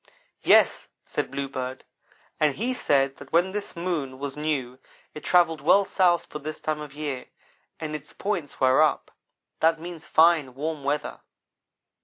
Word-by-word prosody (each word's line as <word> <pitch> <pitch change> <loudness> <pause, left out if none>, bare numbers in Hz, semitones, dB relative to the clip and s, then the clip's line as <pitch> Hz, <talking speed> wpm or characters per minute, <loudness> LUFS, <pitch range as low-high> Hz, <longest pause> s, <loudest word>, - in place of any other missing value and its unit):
"Yes," - - +4 0.2
said - - -2
Bluebird, 130 -2 -4 0.6
"and 150 -3 +2
he 245 +5 -1
said 135 - +1
that 140 -1 -13
when 175 +3 +3
this 205 -1 -5
moon 165 -7 -3
was 140 0 -5
new 140 -4 -2 0.3
it 150 - -9
travelled 165 -4 +3
well 195 +7 +5
south 175 -3 +2
for 150 - -7
this 155 +1 -6
time 155 -1 -2
of 150 -2 -8
year 145 -4 -4 0.5
and 155 -1 -4
its 150 0 -8
points 190 -8 -3
were 130 +3 +5
up. 155 - +1 0.5
That 165 0 +3
means 170 -1 -8
fine, 160 -6 +4
warm 150 +1 -4
weather." 145 +2 -2
150 Hz, 155 wpm, -26 LUFS, 140-170 Hz, 0.6 s, well